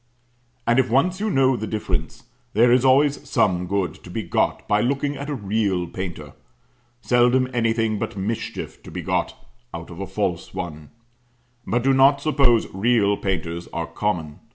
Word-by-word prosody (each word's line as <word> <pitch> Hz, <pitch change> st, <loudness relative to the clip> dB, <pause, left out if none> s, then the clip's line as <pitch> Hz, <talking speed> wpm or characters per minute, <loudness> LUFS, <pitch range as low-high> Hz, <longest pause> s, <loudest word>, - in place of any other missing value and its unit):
And 120 Hz, +2 st, +3 dB
if 130 Hz, -, +2 dB
once 175 Hz, +10 st, +2 dB
you 215 Hz, +1 st, -1 dB
know 135 Hz, -6 st, +3 dB
the 110 Hz, -2 st, -4 dB
difference, 90 Hz, -7 st, -3 dB, 0.3 s
there 120 Hz, +3 st, +5 dB
is 125 Hz, +1 st, +4 dB
always 140 Hz, +2 st, +3 dB
some 90 Hz, -6 st, +1 dB
good 100 Hz, -1 st, -1 dB
to -, -, -11 dB
be 110 Hz, +5 st, -4 dB
got 85 Hz, -, -1 dB
by 105 Hz, 0 st, +2 dB
looking 140 Hz, +4 st, 0 dB
at 140 Hz, +2 st, -6 dB
a 145 Hz, -, -2 dB
real 100 Hz, -5 st, 0 dB
painter 85 Hz, -5 st, -7 dB, 0.7 s
seldom 125 Hz, +1 st, +3 dB
anything 115 Hz, -2 st, +1 dB
but -, -, -4 dB
mischief 105 Hz, +3 st, -4 dB
to -, -, -12 dB
be -, -, -6 dB
got -, -, -1 dB, 0.4 s
out 85 Hz, +1 st, -8 dB
of 85 Hz, -, -10 dB
a 100 Hz, -, -4 dB
false 95 Hz, -3 st, -3 dB
one; 80 Hz, -5 st, -6 dB, 0.8 s
but 120 Hz, +1 st, 0 dB
do 135 Hz, +1 st, +4 dB
not 135 Hz, +1 st, +5 dB
suppose 140 Hz, -6 st, +3 dB
real 105 Hz, 0 st, +2 dB
painters 85 Hz, -3 st, -3 dB
are 85 Hz, -, -3 dB
common. 85 Hz, -7 st, -3 dB
110 Hz, 170 wpm, -23 LUFS, 95-130 Hz, 0.8 s, there